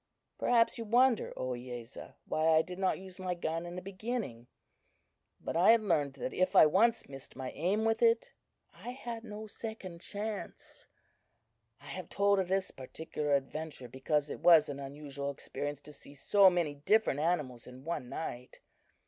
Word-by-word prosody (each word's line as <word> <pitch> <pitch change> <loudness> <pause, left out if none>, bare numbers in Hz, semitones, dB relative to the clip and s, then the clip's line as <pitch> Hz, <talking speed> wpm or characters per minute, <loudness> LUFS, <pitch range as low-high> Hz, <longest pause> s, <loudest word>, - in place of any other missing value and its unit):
"Perhaps 235 0 +3
you 230 - -4
wonder, 240 +2 +3
Ohiyesa, 125 -1 -6
why 155 +1 0
I 160 - +4
did 180 +2 -8
not 190 -1 +1
use 190 0 -10
my 185 -1 -2
gun 165 0 -3
in 175 - -7
the 180 - -6
beginning; 195 - -4 0.9
but - - -5
I 175 +5 +5
had 230 -2 +2
learned 150 -8 +1
that 130 - -4
if 185 0 +1
I - - +9
once 220 +9 +3
missed 135 -1 -10
my 130 -1 -5
aim 195 +7 0
with 225 +1 +1
it, 230 0 +3 0.4
I 245 - -8
had 235 -3 -6
no 215 -1 -7
second 205 -5 -7
chance. 210 +1 -6 0.9
I 145 - -18
have 165 +4 -7
told 200 0 +3
of 190 - 0
this 190 +1 0
particular 145 +2 -2
adventure, 140 -1 -4
because 145 +4 -1
it - - -6
was 165 -4 +6
an 140 -1 -5
unusual 140 0 -5
experience 145 +1 -5
to 150 - -11
see 140 0 -13
so 195 +7 +6
many 170 -5 0
different 150 +2 +2
animals 150 -7 -1
in 125 +1 -12
one 155 -7 -3
night. 125 -5 -6
170 Hz, 170 wpm, -32 LUFS, 140-205 Hz, 0.9 s, I